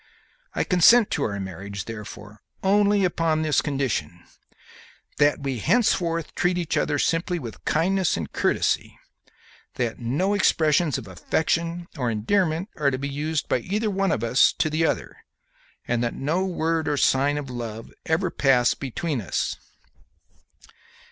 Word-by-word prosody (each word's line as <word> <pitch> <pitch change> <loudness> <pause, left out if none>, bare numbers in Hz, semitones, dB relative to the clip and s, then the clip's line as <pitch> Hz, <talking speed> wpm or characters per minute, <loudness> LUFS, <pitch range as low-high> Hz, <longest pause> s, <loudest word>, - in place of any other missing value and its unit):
I - - +1
consent 200 +6 +5
to - - 0
our 100 -1 -3
marriage, 100 +1 -6
therefore, 105 -1 -9 0.2
only 205 +1 +3
upon 165 -3 0
this 155 -2 +2
condition: 125 - -2 0.9
that 145 -1 +2
we 135 -3 -2
henceforth 170 - +1
treat 180 0 +1
each 170 -3 -2
other 145 -1 +1
simply 170 +4 0
with 120 -9 -8
kindness 185 +3 +1
and 80 -4 -5
courtesy; - - 0 0.8
that 120 -3 -2
no 145 - 0
expressions 160 -6 +2
of 120 -6 -8
affection 165 - -1
or 125 -2 0
endearment 160 - 0
are 145 -2 +2
to 130 - -2
be 140 +2 -4
used 150 +2 -2
by - - +1
either 210 - -2
of 195 - 0
us 115 +3 +4
to 155 - -1
the 160 +1 +2
other, - - -3 0.7
and 120 0 0
that 120 - -2
no 165 +7 -1
word 165 -2 -1
or 145 - 0
sign 140 +2 +2
of 140 -3 -5
love 115 -2 -7
ever 165 +2 +1
pass 125 -3 +3
between 140 +1 -3
us." 95 - -2
150 Hz, 145 wpm, -24 LUFS, 120-175 Hz, 0.9 s, consent